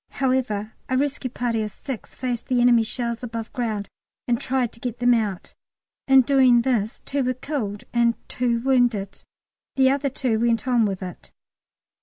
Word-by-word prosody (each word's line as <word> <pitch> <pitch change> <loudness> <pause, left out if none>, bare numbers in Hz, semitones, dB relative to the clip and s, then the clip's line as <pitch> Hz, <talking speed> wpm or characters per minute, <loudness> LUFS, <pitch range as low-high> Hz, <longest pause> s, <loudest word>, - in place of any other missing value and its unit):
However, 250 -6 -1 0.2
a 260 - +1
rescue 280 -1 -1
party 235 -2 -1
of 215 - -2
six 245 +3 -8
faced 245 -2 -3
the 250 -1 +1
enemy 240 -1 +5
shells 235 +1 -3
above 230 -2 -6
ground 215 -5 -2 0.4
and 240 -1 +1
tried 255 -3 0
to - - -16
get 245 -1 -4
them 245 0 +4
out. 210 -6 -2 0.5
In 270 -1 +7
doing 255 -2 +5
this 230 -4 -1
two 280 -1 -2
were 255 0 0
killed 230 -7 -4
and 235 -1 +3
two 240 -2 0
wounded. 240 -7 +1 0.5
The 265 -1 +4
other 280 0 0
two 245 -4 -1
went 235 +1 +1
on 240 -3 +3
with 195 -2 -3
it. 180 -2 -9
240 Hz, 170 wpm, -23 LUFS, 225-260 Hz, 0.5 s, In